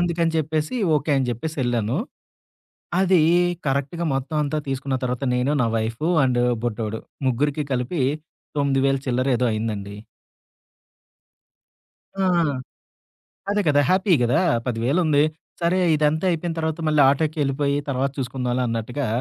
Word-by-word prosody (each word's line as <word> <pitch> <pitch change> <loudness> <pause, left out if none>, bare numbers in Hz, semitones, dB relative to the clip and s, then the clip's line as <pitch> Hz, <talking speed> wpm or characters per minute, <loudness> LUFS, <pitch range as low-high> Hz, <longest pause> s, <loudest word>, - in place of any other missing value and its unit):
అందుకని 170 -1 +1
చెప్పేసి 155 - -1 0.2
ఓకే. 150 +2 -2
అని 130 -2 -1
చెప్పేసి 155 +7 -4
ఎళ్ళాను. 120 - 0 1.0
అది 185 -3 +4 0.5
కరెక్ట్‌గా 140 +5 -1
మొత్తం 140 +4 -3
అంతా 150 +2 -1
తీసుకున్న 135 0 -2
తర్వాత 125 +2 -2
నేను, 125 +3 +1
నా - - +2
వైఫు 115 +7 -2 0.2
అండ్ 125 -1 +1 0.2
బుడ్డోడు. 110 -1 -3 0.3
ముగ్గురికి 145 +4 0
కలిపి 130 +4 -1 0.6
9000ల 135 -1 +2
చిల్లర 130 +2 0
ఏదో 125 - +1
అయిందండి. 105 -2 -3 2.2
ఆ! - - -1 1.3
అదే 205 0 +2
కదా! 145 -1 +4
హ్యాపీ 185 +1 +3
గదా! 120 +1 +2 0.3
10000 125 +8 0
ఉంది. 145 -1 +4 0.4
సరే 170 +2 +2 0.2
ఇదంతా 155 +3 +1
అయిపోయిన 170 0 -2
తర్వాత 160 +1 -2
మళ్ళీ 150 -1 +4
ఆటోకేళ్ళిపోయి. 145 -1 0
తర్వాత 135 +1 0
చూసుకుందాంలే 125 -1 -2
అన్నట్టుగా. 115 +4 -3
140 Hz, 120 wpm, -23 LUFS, 125-155 Hz, 2.2 s, అది